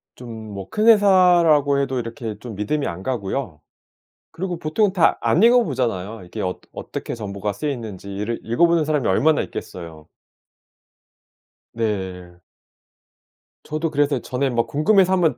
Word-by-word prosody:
좀 110 Hz, -3 st, -9 dB
뭐 95 Hz, -1 st, -7 dB
큰 215 Hz, +2 st, 0 dB
회사라고 175 Hz, -9 st, +5 dB
해도 135 Hz, -2 st, -1 dB
이렇게 115 Hz, -2 st, -6 dB
좀 115 Hz, -2 st, -8 dB
믿음이 140 Hz, +9 st, -1 dB
안 85 Hz, +2 st, -6 dB
가고요. 110 Hz, -, -3 dB, 0.7 s
그리고 180 Hz, -1 st, -4 dB
보통 185 Hz, +6 st, +1 dB
다 180 Hz, -4 st, +3 dB
안 175 Hz, -, +2 dB
읽어 240 Hz, +1 st, +6 dB
보잖아요. 115 Hz, -, -3 dB
이게 90 Hz, -, -8 dB
어ㄸ 90 Hz, 0 st, -3 dB
어떻게 -, -, -6 dB
정보가 105 Hz, -2 st, -4 dB
쓰이는지 105 Hz, -6 st, -5 dB
이를 105 Hz, +4 st, -3 dB
읽어보는 165 Hz, +7 st, +3 dB
사람이 150 Hz, -4 st, 0 dB
얼마나 145 Hz, +11 st, +3 dB
있겠어요. 80 Hz, -4 st, -8 dB, 1.7 s
네. 95 Hz, -6 st, -4 dB, 1.2 s
저도 155 Hz, +1 st, -3 dB
그래서 145 Hz, -3 st, +1 dB
전에 130 Hz, +3 st, -2 dB
막 120 Hz, -1 st, 0 dB
궁금해서 185 Hz, +5 st, +3 dB
한번 175 Hz, -4 st, +2 dB
125 Hz, 305 characters per minute, -21 LUFS, 105-160 Hz, 1.7 s, 읽어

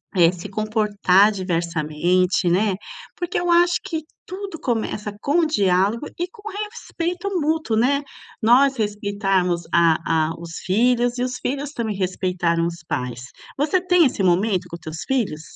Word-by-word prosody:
eh, 170 Hz, -2 st, +5 dB
se 180 Hz, +3 st, -8 dB
comportar 210 Hz, -1 st, +3 dB
diversamente, 175 Hz, -1 st, 0 dB
né, 195 Hz, +3 st, +2 dB, 0.4 s
porque 350 Hz, -1 st, -2 dB
eu 350 Hz, 0 st, -2 dB
acho 345 Hz, +1 st, +4 dB
que 325 Hz, -5 st, -4 dB, 0.2 s
tudo 380 Hz, -3 st, -7 dB
começa 215 Hz, -3 st, -2 dB
com 320 Hz, +4 st, +2 dB
diálogo 205 Hz, -, +1 dB
e 350 Hz, -, -1 dB
com 445 Hz, +2 st, -17 dB, 0.3 s
respeito 360 Hz, -4 st, -4 dB
mútuo, 310 Hz, -7 st, 0 dB
né. 275 Hz, +5 st, +2 dB, 0.4 s
Nós 260 Hz, +5 st, +5 dB
respeitarmos 200 Hz, -5 st, 0 dB
a 165 Hz, -1 st, +3 dB
a 165 Hz, -, -5 dB
os 165 Hz, 0 st, -8 dB
filhos 240 Hz, +5 st, +2 dB
e 245 Hz, -, 0 dB
os 250 Hz, 0 st, -3 dB
filhos 280 Hz, +2 st, -3 dB
também 225 Hz, -7 st, -3 dB
respeitaram 180 Hz, -3 st, 0 dB
os 170 Hz, -1 st, -7 dB
pais. 125 Hz, -1 st, -3 dB, 0.4 s
Você 295 Hz, +6 st, +2 dB
tem 360 Hz, -2 st, +4 dB
esse 255 Hz, -, 0 dB
momento 185 Hz, +2 st, +2 dB
com -, -, -6 dB
teus 160 Hz, -1 st, -7 dB
filhos? 220 Hz, -13 st, -1 dB
210 Hz, 145 wpm, -22 LUFS, 180-280 Hz, 0.4 s, eh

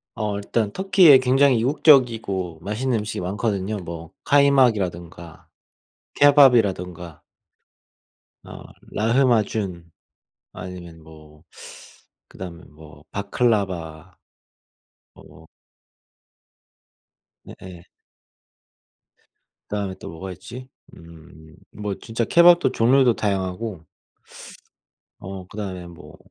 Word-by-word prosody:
어. 105 Hz, -3 st, -3 dB
일단 105 Hz, +1 st, -2 dB
터키에 185 Hz, -, +5 dB
굉장히 130 Hz, 0 st, +3 dB
이국적이고 115 Hz, -, +2 dB
맛있는 110 Hz, +4 st, -2 dB
음식이 105 Hz, -2 st, -5 dB
많거든요. 100 Hz, +2 st, -3 dB
뭐 85 Hz, -3 st, -9 dB
카이막이라든가 100 Hz, -, +1 dB, 0.7 s
케밥이라든가 100 Hz, -, +3 dB, 1.2 s
어 -, -, -11 dB, 0.3 s
라흐마준 110 Hz, -7 st, 0 dB, 0.6 s
아니면 85 Hz, -3 st, -10 dB
뭐 75 Hz, -1 st, -17 dB, 0.9 s
그다음에 90 Hz, -2 st, -10 dB
뭐 75 Hz, 0 st, -17 dB
바클라바 95 Hz, -6 st, -2 dB, 1.0 s
어 -, -, -18 dB, 2.0 s
네 -, -, -12 dB
예. 90 Hz, -2 st, -11 dB, 1.9 s
그다음에 100 Hz, -2 st, -4 dB
또 -, -, -9 dB
뭐가 95 Hz, +3 st, -8 dB
있지? 125 Hz, +8 st, -11 dB, 0.3 s
음 80 Hz, -1 st, -16 dB, 0.2 s
뭐 105 Hz, -1 st, -5 dB
진짜 115 Hz, 0 st, -3 dB
케밥도 170 Hz, +3 st, +5 dB
종류도 125 Hz, +1 st, +3 dB
다양하고 95 Hz, -2 st, -4 dB, 1.3 s
어 95 Hz, 0 st, -9 dB
그다음에 95 Hz, -4 st, -7 dB
뭐 85 Hz, -2 st, -14 dB
100 Hz, 200 characters per minute, -22 LUFS, 85-120 Hz, 2.0 s, 터키에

